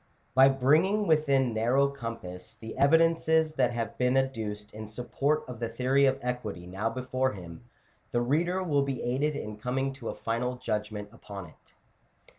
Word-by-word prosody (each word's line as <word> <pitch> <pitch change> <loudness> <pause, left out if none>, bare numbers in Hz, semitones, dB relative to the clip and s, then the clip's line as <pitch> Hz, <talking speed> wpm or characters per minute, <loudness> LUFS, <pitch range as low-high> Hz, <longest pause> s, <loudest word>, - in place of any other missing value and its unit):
By 130 +1 +7
bringing 155 +11 +3
within 140 - +3
narrow 120 +5 +3
compass 115 -9 -7
the 110 0 -8
evidences 160 +1 +4
that 130 -5 +2
have 115 -3 -4
been 125 +1 +3
adduced 110 -6 -2
in 110 0 -7
support 135 +7 -1
of 125 -3 -8
the 115 -1 -2
Theory 130 +4 +3
of 130 0 +2
Equity 115 -8 -4
now 95 +5 -2
before 130 +1 -1
him, 90 +2 -10 0.5
the 120 - +1
reader 170 +9 +1
will 145 -5 +2
be 135 -3 -2
aided 140 +5 0
in 105 -5 -5
coming 130 +4 -1
to 130 -4 -6
a - - -4
final 125 +2 -2
judgment 105 -4 -3
upon 100 -4 -9
it. - - -24
125 Hz, 165 wpm, -29 LUFS, 110-140 Hz, 0.5 s, By